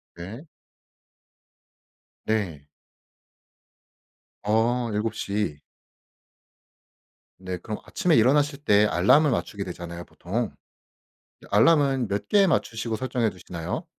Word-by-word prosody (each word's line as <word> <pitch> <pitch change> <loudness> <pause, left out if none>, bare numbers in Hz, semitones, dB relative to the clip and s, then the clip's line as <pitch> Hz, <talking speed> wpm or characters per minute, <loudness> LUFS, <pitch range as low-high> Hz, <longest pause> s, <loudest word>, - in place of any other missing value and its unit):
네. 110 - -9 1.8
네. 90 -10 -2 1.8
아 115 +3 +1
7:00. 105 -5 -2 1.8
네 95 -1 -5
그럼 105 +4 -6
아침에 180 -6 +1
일어나실 140 +5 +3
때 105 +1 +5
알람을 105 - +4
맞추게 100 -4 -2
되잖아요 85 -1 -7
보통. 105 +5 -3 0.9
이 - - -14
알람은 135 +1 +4
몇 100 +1 -3
개 200 -1 +5
맞추시고 115 -8 -1
설정해두시나요? 105 - -3
110 Hz, 185 characters per minute, -25 LUFS, 95-130 Hz, 1.8 s, 때